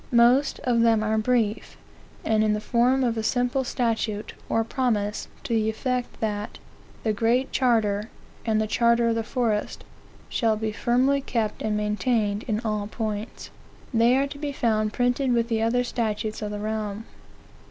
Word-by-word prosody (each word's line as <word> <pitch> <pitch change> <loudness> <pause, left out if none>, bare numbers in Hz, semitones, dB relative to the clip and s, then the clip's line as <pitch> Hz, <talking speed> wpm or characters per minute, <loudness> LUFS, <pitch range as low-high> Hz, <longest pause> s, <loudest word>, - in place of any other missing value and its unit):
Most 250 +4 +4
of 240 -2 +2
them 225 -2 +4
are 220 0 +1
brief, 225 -2 0 0.5
and 215 -1 +3
in 215 -1 +2
the 210 - -1
form 250 +4 +2
of 235 -2 0
a - - 0
simple 245 +3 0
statute, 225 -4 -2 0.2
or 225 - +2
promise, 220 -4 -1 0.2
to - - -3
the 220 -1 +2
effect 250 +2 -3
that 210 -1 -3 0.5
"The 220 - +1
Great 235 +5 +1
Charter, 220 -4 +1 0.3
and 220 -1 +1
the 215 - +1
Charter 235 +1 +3
of - - +2
the 225 - -1
Forest, 225 -3 -1 0.4
shall 225 -3 +1
be 220 0 -2
firmly 255 +5 +2
kept 225 -5 -2
and 210 -1 0
maintained 210 0 0
in 215 0 0
all 215 -3 -2
points." 215 0 -5 0.4
They 235 +2 +4
are 275 - +2
to 285 0 -8
be 295 -1 -3
found 215 -5 0
printed 245 +2 +1
with 235 0 +1
the 225 -1 0
other 240 +2 +2
statutes 215 -3 -2
of 210 - -3
the 210 - -4
realm. 215 0 -3
225 Hz, 170 wpm, -25 LUFS, 215-245 Hz, 0.5 s, Most